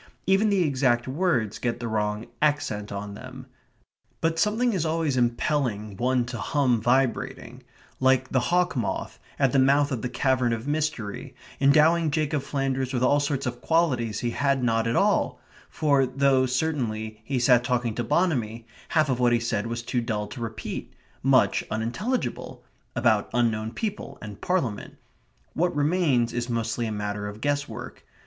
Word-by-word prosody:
Even 195 +3 +3
the 195 -3 +3
exact 130 -5 +1
words 130 - 0
get 120 -1 -2
the 120 - -4
wrong 105 0 -1 0.2
accent 145 -9 0
on 100 0 -5
them. 130 +4 -10 0.7
But 165 0 0
something 225 +5 +2
is 180 -5 0
always 160 -3 0
impelling 120 -4 0
one 125 +3 +1
to 120 - -6
hum 130 -6 +1
vibrating, 125 +2 0 0.4
like 130 0 +3
the 130 - +2
hawk 180 +6 +1
moth, 120 -5 -3 0.2
at 135 -3 +3
the 135 - +3
mouth 140 +2 +4
of 125 -4 -2
the 125 - -3
cavern 130 -1 +1
of 115 +3 -4
mystery, 145 -9 -3 0.2
endowing 155 +4 +4
Jacob 150 -1 0
Flanders 135 -1 -2
with 125 - 0
all 145 +3 +4
sorts 140 -1 -1
of 120 -1 -4
qualities 130 -10 +1
he 120 - -1
had 140 0 +1
not 115 -1 +1
at 115 - 0
all - - +2 0.3
for 140 -4 +2
though, 130 0 +2
certainly, 120 -6 -2
he 135 +3 -2
sat 120 0 +4
talking 125 -2 0
to 120 - -2
Bonamy, 115 -7 0 0.2
half 155 -2 +3
of 130 -2 0
what 120 -1 +3
he 120 - +3
said 115 -2 -2
was 115 0 -4
too 120 +1 -1
dull 110 -3 -2
to 125 - -8
repeat; 110 -1 -5 0.3
much 130 -7 +3
unintelligible 120 - -3 0.3
(about - - +2
unknown 110 -2 +1
people 210 - -5
and 105 -1 -9
Parliament); 135 - -2 0.6
what 175 +2 0
remains 145 -6 +2
is 120 0 -2
mostly 115 0 -1
a - - -3
matter 105 0 -3
of 105 +1 -8
guess 145 +2 -1
work. - - -8
130 Hz, 165 wpm, -26 LUFS, 115-145 Hz, 0.7 s, mouth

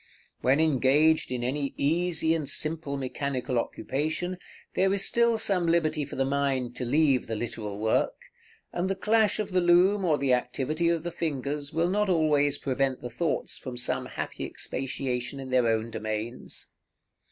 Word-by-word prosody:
When 135 +4 +3
engaged 155 0 +3
in 125 -1 -2
any 140 +2 -2
easy 160 +2 +2
and 155 -4 -1
simple 155 -2 0
mechanical 130 -2 -2
occupation, 155 +9 -3 0.3
there 190 0 +2
is 195 0 +1
still 235 -1 +3
some 190 -5 +1
liberty 155 -3 +1
for 140 - -8
the 135 - +1
mind 135 -3 -1
to 125 - -2
leave 140 0 +2
the 115 - -3
literal 105 -2 -5
work; 110 +1 +1 0.6
and 175 +2 -1
the 195 - 0
clash 215 +1 +2
of 215 -2 -3
the 180 0 +2
loom 180 +4 +4
or 160 -5 +3
the 135 -2 +2
activity 135 +7 0
of 170 -2 0
the 175 - -3
fingers 145 -2 -3
will 170 +2 +1
not 210 0 +1
always 150 -4 +3
prevent 135 -1 -1
the 125 - -5
thoughts 160 +7 -2
from 125 -2 -7
some 120 - 0
happy - - -5
expatiation 130 0 -3
in 130 -1 -7
their 125 -2 +3
own 115 0 0
domains. 110 +2 -5
145 Hz, 165 wpm, -27 LUFS, 130-170 Hz, 0.6 s, loom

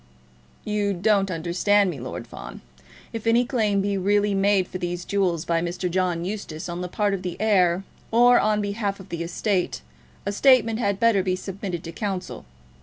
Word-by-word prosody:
"You 210 -1 0
don't 195 +1 +2
understand 185 +4 +2
me, 145 - -8
Lord 125 +1 -6
Fawn. - - -10 0.5
If 225 0 -5
any 235 +2 +4
claim 215 -6 +1
be 200 0 -1
really 205 +2 +2
made 195 -1 +2
for 185 - -6
these 175 0 -3
jewels 180 -5 0
by 165 -1 +1
Mr. 175 +1 -3
John 180 -2 0
Eustace 185 -6 -5
on 175 0 -4
the 180 - -3
part 205 +2 0
of 195 - -2
the 180 -2 -5
heir, 190 -4 +3 0.3
or 245 +2 +6
on 210 0 +2
behalf 205 -1 -2
of 195 - -12
the 170 - -4
estate, 180 - -1 0.4
a 200 - 0
statement 230 -1 +4
had 200 -4 0
better 230 -4 +4
be 185 -1 0
submitted 185 -2 -5
to 165 - -6
counsel. 190 0 -4
195 Hz, 180 wpm, -24 LUFS, 180-210 Hz, 0.5 s, or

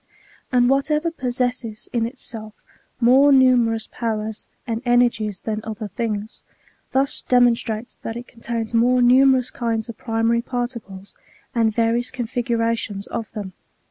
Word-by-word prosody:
And 245 -1 +4
whatever 300 +5 +1
possesses 245 -5 -2
in 230 -1 +1
itself 225 -4 -6 0.4
more 260 +4 +6
numerous 245 -4 +4
powers 220 -2 -4 0.2
and 230 0 -3
ener 245 -1 +4
gies 210 -4 -5
than 220 -1 -2
other 220 0 -5
things, 215 +1 -4 0.5
thus 270 +1 +1
demonstrates 240 -2 +1
that 225 - -6
it 245 - -8
contains 230 -1 -5
more 245 +2 +4
numerous 255 0 +5
kinds 230 -1 -2
of 230 - -7
primary 225 0 +1
particles 235 -6 -5 0.4
and 230 -2 +2
various 230 +2 +1
configura 235 -2 -1
tions 200 -3 -5
of 225 - -5
them. 200 -4 -6
235 Hz, 135 wpm, -22 LUFS, 220-250 Hz, 0.5 s, more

